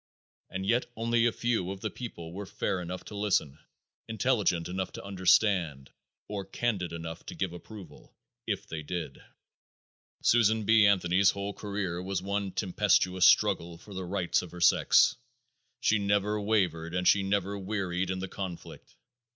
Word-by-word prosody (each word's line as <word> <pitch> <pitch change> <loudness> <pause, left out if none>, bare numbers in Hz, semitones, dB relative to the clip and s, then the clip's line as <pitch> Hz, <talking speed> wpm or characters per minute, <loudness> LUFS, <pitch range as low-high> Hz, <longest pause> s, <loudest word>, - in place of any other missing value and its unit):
And 95 0 -4
yet 120 +5 +1
only 115 +1 +2
a - - +2
very - - -19
few 115 -7 0
of 95 0 -6
the 110 - -3
people 85 -9 -8
were 100 +1 -6
fair 95 -1 -2
enough 90 +1 -6
to 105 - -9
listen, 100 -9 0 0.5
intelligent 110 -6 +1
enough 95 +1 -3
to - - -8
understand, 95 - +2 0.4
or 100 -2 -4
candid 95 -2 -2
enough 85 0 -6
to - - -7
give 95 -3 -2
approval, 95 +2 -12 0.4
if - - -2
they 80 -1 -6
did. 75 -2 -5 1.0
Susan 110 -2 +4
B. 110 0 +5
Anthony's 95 -1 +4
whole 100 +1 -3
career 100 -5 -4
was 95 0 -2
one 100 +1 -2
tempestuous 95 -2 +2
struggle 85 0 +3
for 100 +4 -13
the 95 0 -4
rights 90 -1 0
of 90 - -9
her 90 - -8
sex. 85 - +5 0.6
She 105 - +3
never 100 +1 +1
wavered 90 -6 0
and 90 0 0
she 100 - +5
never 100 0 -1
wearied 95 -2 -2
in 95 - -1
the 95 +1 -4
conflict. 95 -3 -8
95 Hz, 160 wpm, -29 LUFS, 90-105 Hz, 1.0 s, B